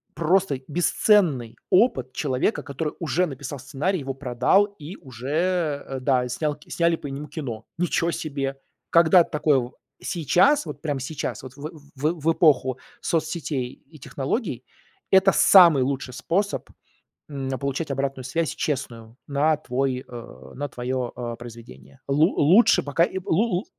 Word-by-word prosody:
просто 170 -4 +1
бесценный 165 - +2
опыт 180 - +3
человека, 135 - -1
который 145 +3 -4
уже 175 +2 0
написал 140 -1 -7
сценарий, 145 +8 -2
его 135 -1 -5
продал 135 +9 +2
и 155 +6 -8
уже, 145 +2 -2
да, 130 -2 +2
и 125 - -6
снял 150 +3 -2
сняли 170 -1 +1
по 150 - -8
нему 140 +2 -6
кино. 120 -10 -6
Ниче 170 0 0
себе! 135 -4 -4 0.3
Когда-то 170 +1 +5
такое 140 -5 +1 0.3
сейчас, 185 - +2
вот - - -8
прямо 145 -4 -2
сейчас, 135 +1 -5
вот 130 -1 -9
в 145 +2 -6 0.3
в 155 +3 0
эпоху 135 -7 +3 0.2
соцсетей 155 -6 -2
и 155 +2 -19
технологий- 135 - -3 0.5
это 190 0 +6
самый 170 -8 +7
лучший 130 -1 -3
способ, 195 +8 -1 0.6
м, 135 -3 -5
получать 140 +3 -3
обратную 135 -1 -2
связь 165 +4 -1
честную 120 -5 -4
на 150 +2 +2
твой 130 -1 -2
а, 65 - -11
на 145 +1 -4
твое, 125 0 -3
а, 120 -1 -5
произведение. 120 +2 -13
Лу 150 +6 +3
лучше 180 +11 +5
пока 145 +4 +2
и 185 - -1
лу 190 +7 +2
лу 190 -1 -2
145 Hz, 140 wpm, -24 LUFS, 130-165 Hz, 0.6 s, самый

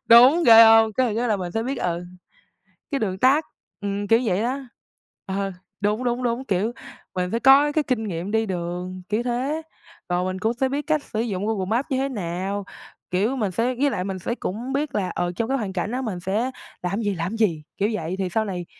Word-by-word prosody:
đúng, 270 +9 +7
ghê 225 0 +10
hông? 225 -1 +6
Cái 245 -3 +1
cái 240 +1 0
là 215 - +2
mình 180 -3 -5
sẽ 225 - -1
biết, 265 +2 -3
ừ, 175 0 -2 0.9
cái 275 - +1
đường 190 -4 -2
tắc, 275 +6 +4 0.4
ừm, 205 0 -2
kiểu 225 +3 +5
vậy 195 -3 +1
đó. 255 +4 -1 0.7
Ờ, 195 0 -2 0.3
đúng, 210 +4 0
đúng, 245 +1 0
đúng, 245 +1 -1
kiểu, 205 +4 0 0.4
mình 180 -1 -1
phải 230 +3 -1
có 280 +2 +6
cái 310 0 +2
kinh 240 -4 -1
nghiệm 175 +1 -4
đi 220 +1 +1
đường, 180 0 -4
kiểu 215 +3 0
thế, 260 +6 -1 0.5
rồi 180 0 +1
mình 185 0 -3
cũng 220 +1 +1
sẽ 265 +2 0
biết 285 +2 -2
cách 305 -2 +1
sử 220 - -3
dụng 205 -4 -2
Google 210 -4 -1
Maps 230 +7 0
như 260 - +1
thế 270 - 0
nào. 195 -2 -3 0.5
Kiểu, 205 +8 +1
mình 210 -6 0
sẽ 235 +7 0
với 280 +3 +1
lại 180 - -2
mình 190 -1 -3
sẽ 235 +7 -3
cũng 240 +5 -4
biết 280 +1 -1
là, 190 -3 0
ờ, 175 0 -1
trong 230 +3 -1
cái 275 - +1
hoàn 205 -5 -3
cảnh 190 +5 -2
đó 260 - -2
mình 200 -8 -4
sẽ 215 +8 -1 0.3
làm 195 +4 -1
gì, 205 -2 0
làm 175 +5 -3
gì, 175 -9 +1
kiểu 205 - +1
vậy, 170 -4 -3
thì 190 - -1
sau 220 +5 0
này 180 -4 -4
220 Hz, 230 wpm, -23 LUFS, 185-250 Hz, 0.9 s, ghê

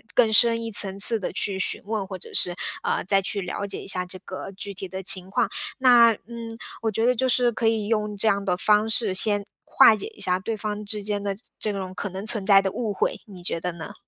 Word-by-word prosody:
更 230 -3 +4
深 230 +1 +4
一 225 - -5
层 195 -2 +3
次 225 +2 +6
地 190 - -4
去 195 -2 -2
询 - - -1
问， 210 -2 -3
或 190 -1 -7
者 - - -14
是， 175 - +1 0.3
呃， - - -1
再 195 +2 +3
去 200 +1 -3
了 195 +2 -4
解 - - -5
一 - - -11
下 180 -2 -1
这 180 +1 -8
个 185 +1 -8
具 200 +1 -8
体 190 0 -7
的 190 +1 -7
情 185 0 +3
况。 205 +2 0 0.3
那 240 -3 +6
嗯， 230 -1 -8 0.2
我 225 - 0
觉 225 +2 0
得 250 - +4
就 260 +3 0
是 245 -1 +2
可 230 0 -1
以 220 -2 0
用 210 -1 -1
这 215 - +2
样 200 -1 +1
的 180 -3 +1
方 210 +3 +2
式 220 -3 +2
先 205 +1 +3 0.2
化 220 - +6
解 215 - -6
一 - - -11
下 180 0 +1
对 220 +4 -4
方 210 0 -5
之 210 +1 -2
间 205 0 -2
的 200 -1 -2 0.2
这 215 - -1
种 190 -2 -5
可 205 - -4
能 190 +2 -7
存 215 -3 +1
在 195 -1 +6
的 195 -1 -2
误 220 -1 -3
会， - - -1
你 190 -4 -12
觉 170 - -2
得 180 +2 -3
呢？ 165 -2 -8
205 Hz, 275 characters per minute, -24 LUFS, 190-225 Hz, 0.3 s, 次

